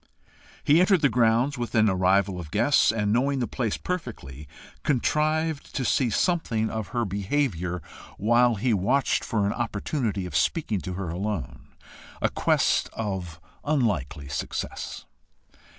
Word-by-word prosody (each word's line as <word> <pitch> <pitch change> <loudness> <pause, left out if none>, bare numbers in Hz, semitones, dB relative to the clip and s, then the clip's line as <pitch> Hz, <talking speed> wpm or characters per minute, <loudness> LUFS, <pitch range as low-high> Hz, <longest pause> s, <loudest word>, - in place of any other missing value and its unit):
He 150 +3 +5
entered 185 -1 +4
the 145 - +4
grounds 120 +3 +2
with 120 0 -4
an 110 -1 +5
arrival 95 0 +2
of 80 -3 -7
guests, 145 - +3
and 105 -2 0
knowing 135 +4 +1
the 125 - 0
place 115 -3 -2
perfectly, 75 - -6 0.3
contrived 155 +3 0
to 130 - -1
see 125 0 +2
something 115 - 0
of 110 -2 -3
her 120 -1 -1
behaviour, 95 - -1 0.3
while 120 +3 +3
he 115 +4 +1
watched 120 +8 +1
for 105 -3 0
an 100 - 0
opportunity 110 -3 -2
of 90 - -7
speaking 110 - 0
to 90 +4 -5
her 90 -1 -4
alone, 95 +1 -4 0.5
a - - +1
quest - - +2
of 95 -7 -4 0.2
unlikely 100 - -1
success. 65 - -5
110 Hz, 140 wpm, -26 LUFS, 95-135 Hz, 0.5 s, He